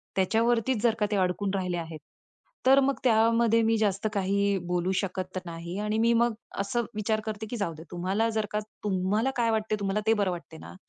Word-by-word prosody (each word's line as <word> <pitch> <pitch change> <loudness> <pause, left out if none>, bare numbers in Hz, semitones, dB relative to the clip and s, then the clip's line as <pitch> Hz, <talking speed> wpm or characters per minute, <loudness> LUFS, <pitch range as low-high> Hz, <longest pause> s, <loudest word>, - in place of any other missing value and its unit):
त्याच्यावरतीच 230 +4 +2
जर 230 -2 +3
का 210 - +3
ते - - +1
अडकून 185 +1 0
राहिले 180 -2 -1
आहेत. 165 -2 -6 0.7
तर 270 +1 +7
मग 275 0 +2
त्यामध्ये 230 -1 +4
मी 225 0 +3
जास्त 205 -1 0
काही 200 0 +1
बोलू 180 +1 0
शकत 185 -1 -4
नाही 170 +1 -6
आणि 210 +1 -1
मी 230 +1 +4
मग 235 0 +3 0.3
असं 230 +4 -1
विचार 215 +1 0
करते 220 -1 -4
की 240 - -4
जाऊ 200 -6 -2
दे, 160 0 -11
तुम्हाला 190 +6 0
जर 220 -1 -1
का 210 - 0 0.2
तुम्हाला 205 +4 +1
काय 230 -1 +2
वाटतंय 215 -1 0
तुम्हाला 200 +1 0
ते 225 - +6
बरं 200 -4 +1
वाटत 170 -2 -8
ना, - - -10
210 Hz, 200 wpm, -27 LUFS, 185-225 Hz, 0.7 s, तर